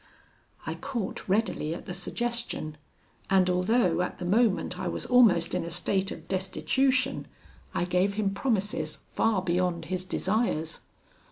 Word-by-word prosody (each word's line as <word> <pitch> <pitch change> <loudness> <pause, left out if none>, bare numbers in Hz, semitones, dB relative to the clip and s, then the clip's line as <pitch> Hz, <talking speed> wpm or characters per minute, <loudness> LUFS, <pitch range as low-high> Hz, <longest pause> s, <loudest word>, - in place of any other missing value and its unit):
"I - - -2
caught 255 -9 -4
readily 185 -6 +1
at - - -9
the 180 - -5
suggestion, 235 -5 -2 0.5
and, 190 -1 +4
although 180 -1 +2
at 180 - -3
the 180 - -5
moment 195 -2 +2
I 185 - -2
was - - -3
almost 220 -10 +5
in 180 -1 0
a 170 - -5
state 190 +3 0
of - - -8
destitution, 260 +7 +1 0.5
I - - +1
gave 180 +3 +1
him 200 -2 0
promises 210 -2 -1
far 215 -5 +1
beyond 175 -2 0
his 185 0 -1
desires. 185 -4 -1
190 Hz, 145 wpm, -28 LUFS, 180-225 Hz, 0.5 s, almost